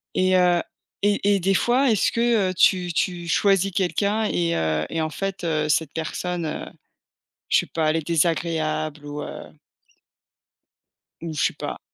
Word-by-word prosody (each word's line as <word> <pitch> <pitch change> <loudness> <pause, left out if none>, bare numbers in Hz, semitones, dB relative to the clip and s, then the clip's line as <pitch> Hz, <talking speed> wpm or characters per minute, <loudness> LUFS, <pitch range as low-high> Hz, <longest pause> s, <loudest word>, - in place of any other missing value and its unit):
Et 185 0 +3
heu, 180 -1 +4 0.4
et 205 0 +3
et - - +1
des 195 +2 +1
fois, 250 +6 +3
est-ce 215 - +2
que, 230 -5 +2
heu, - - -3
tu 180 0 +3
tu 175 0 -1
choisis 195 +2 +2
quelqu'un 200 +4 0
et 170 -4 0
heu 80 -1 0
et 165 - -2
en 155 - -1
fait, 195 +1 -4
heu, 155 -2 0
cette 150 0 +1
personne, 170 +2 -3
heu, 155 - -4 0.8
je - - +5
sais - - -3
pas, 160 -2 0
elle 155 - +1
est 160 - -4
désagréable 155 -2 0
ou 145 0 -6
heu - - -9 1.7
ou 165 - -5
je 150 - -1
sais - - +1
pas. - - -6
175 Hz, 170 wpm, -23 LUFS, 155-195 Hz, 1.7 s, je